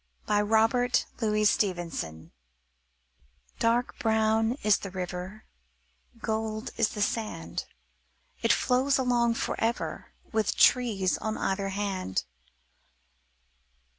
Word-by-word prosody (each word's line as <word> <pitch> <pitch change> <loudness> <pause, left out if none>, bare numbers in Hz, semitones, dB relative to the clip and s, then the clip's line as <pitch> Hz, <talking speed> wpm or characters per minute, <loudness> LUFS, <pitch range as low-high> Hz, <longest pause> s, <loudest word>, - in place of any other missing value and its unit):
Robert 225 +4 +3
Louis 215 -2 +1
Stevenson 170 - -1 1.3
Dark 235 +2 +1
brown 220 0 +2
is 210 -2 +4
the 195 - -6
river, 185 +2 -6 0.8
Golden 220 0 -3
is 230 -2 +2
the 210 - -1
sand. 220 0 -3 0.8
It - - +3
flows 265 +2 +2
along 240 -2 +2
forever, 230 0 -2 0.2
With 220 -2 0
trees 210 -7 +3
on 220 0 -3
either 195 0 -1
hand. 195 - -2
220 Hz, 90 wpm, -28 LUFS, 195-230 Hz, 1.3 s, is